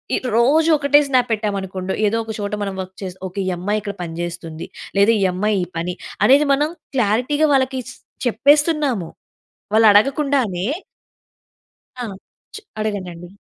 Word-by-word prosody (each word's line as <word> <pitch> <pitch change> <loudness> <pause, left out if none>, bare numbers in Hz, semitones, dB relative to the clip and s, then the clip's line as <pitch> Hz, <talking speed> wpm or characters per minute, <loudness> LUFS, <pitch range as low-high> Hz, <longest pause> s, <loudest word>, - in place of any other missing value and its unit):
ఇ - - +2 0.2
రోజూ 295 +8 +4
ఒకటే 290 0 +4
స్నాప్ 255 -3 +2
పెట్టామనుకోండొ, 195 -3 -2
ఏదో 220 +2 0
ఒక 220 - -6
చోట 205 0 -4
మనం 195 -1 -3
వర్క్ 185 0 -9
చేస్ 185 -2 -5
ఓకే. 185 +2 -7
ఈ - - +1
అమ్మాయి 205 +4 -1
ఇక్కడ 200 -1 -5
పని 165 -1 -6
చేస్తుంది. 170 -2 -6 0.3
లేదా, 200 +3 +5
ఈ - - +2
అమ్మాయి 210 +3 0
ఈ - - -2
పని, 175 +2 -3 0.3
అనేది 285 +3 +5
మనం 295 +2 +1 0.3
క్లారిటీగా 250 +7 +2
వాళ్ళకీ 260 -1 +1
స్ - - -13 0.3
చెప్పేస్తున్నాము. 285 - +2 0.6
వాళ్ళు 220 0 +6
అడగకుండానే 245 -4 +2 1.3
ఆ! 250 - -4 0.5
చ్ - - -5 0.2
అడగండండి. 185 -5 -4
215 Hz, 150 wpm, -20 LUFS, 190-270 Hz, 1.3 s, వాళ్ళు